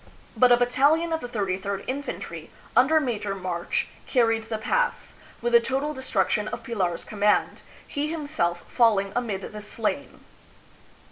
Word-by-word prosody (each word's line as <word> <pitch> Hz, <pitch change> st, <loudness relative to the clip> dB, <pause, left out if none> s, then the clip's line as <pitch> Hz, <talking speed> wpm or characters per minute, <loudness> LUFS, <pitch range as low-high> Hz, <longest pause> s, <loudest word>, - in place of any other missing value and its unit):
But 250 Hz, -1 st, +5 dB
a 240 Hz, -, +8 dB
battalion 285 Hz, +7 st, +3 dB
of 320 Hz, -, 0 dB
the 245 Hz, -, -5 dB
33d 200 Hz, -3 st, -2 dB
Infantry, 280 Hz, +3 st, -5 dB, 0.3 s
under 305 Hz, +6 st, +5 dB
Major 215 Hz, -8 st, -2 dB
March, 180 Hz, -2 st, -2 dB, 0.2 s
carried 225 Hz, -3 st, +2 dB
the 220 Hz, -, -1 dB
pass, -, -, -1 dB, 0.3 s
with 240 Hz, 0 st, 0 dB
the 235 Hz, -, +9 dB
total 270 Hz, +5 st, -1 dB
destruction 250 Hz, -5 st, 0 dB
of -, -, -5 dB
Pilar's 190 Hz, -8 st, -2 dB
command, 210 Hz, 0 st, +1 dB, 0.3 s
he 290 Hz, +1 st, -2 dB
himself 290 Hz, -, -1 dB
falling 210 Hz, -5 st, +3 dB
amid 215 Hz, -6 st, -2 dB
the 210 Hz, 0 st, -7 dB
slain. 225 Hz, +6 st, -3 dB
235 Hz, 140 wpm, -26 LUFS, 200-270 Hz, 0.3 s, the